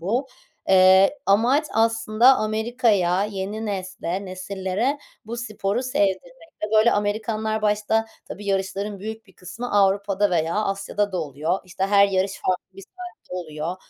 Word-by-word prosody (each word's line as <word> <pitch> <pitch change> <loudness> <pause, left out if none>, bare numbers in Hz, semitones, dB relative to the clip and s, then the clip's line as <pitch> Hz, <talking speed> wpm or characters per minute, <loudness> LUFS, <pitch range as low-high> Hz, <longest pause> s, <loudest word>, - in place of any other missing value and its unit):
bu. 230 +10 -1 0.4
Eee, 190 +6 +6
amaç, 245 +10 +3
aslında, 225 +3 +4
Amerika'ya, 215 -4 +1
yeni 210 +2 -4
nesle, 185 -1 -4
nesillere 190 +8 -2 0.3
bu 235 +2 -5
sporu 215 -1 -2
sevdirmekte. 255 - -2 0.3
Böyle, 220 +2 +5
Amerikanlar 215 +1 -1
başta 215 +1 +1 0.2
tabii, 205 0 -9
yarışların 195 +1 -2
büyük 220 +2 -7
bir 190 - -20
kısmı 195 +8 -7
Avrupa'da 200 0 +2
veya 165 -1 0
Asya'da 205 0 -1
da 185 - -1
oluyor. 155 +5 -2
İşte, 190 +1 -3
her 200 0 +5
yarış 190 0 0
farklı 185 +1 -2
bir - - -9
saatte 360 - -11
oluyor. 160 0 -5
200 Hz, 135 wpm, -23 LUFS, 190-220 Hz, 0.4 s, Eee